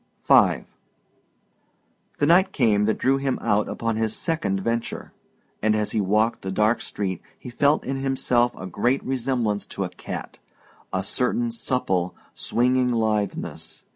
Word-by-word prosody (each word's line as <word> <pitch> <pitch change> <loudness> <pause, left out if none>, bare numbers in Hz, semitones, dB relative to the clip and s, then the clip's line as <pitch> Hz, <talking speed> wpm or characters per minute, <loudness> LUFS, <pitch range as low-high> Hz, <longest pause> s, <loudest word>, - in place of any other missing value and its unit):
V - - +5 1.5
The 145 - +2
night 185 +5 +5
came 105 - +2
that 110 - +1
drew 135 +1 +2
him 135 -1 -1
out 105 -2 +1
upon 115 -1 -2
his 110 -1 0
second 160 - -1
venture, 115 +2 -3 0.5
and 110 0 +3
as 105 -1 -1
he 110 - +1
walked 105 +4 +1
the 95 - -4
dark 105 +4 +2
street 95 -4 -4 0.2
he 125 - -9
felt 145 +5 +2
in 135 +1 -2
himself 125 -3 +2
a 95 - -7
great 120 +9 0
resemblance 125 -5 -1
to - - -4
a - - -3
cat - - -7 0.5
a - - -1
certain 235 - 0
supple, 95 - -1 0.2
swinging 125 +1 +1
litheness. 110 -3 -2
115 Hz, 145 wpm, -24 LUFS, 105-135 Hz, 1.5 s, V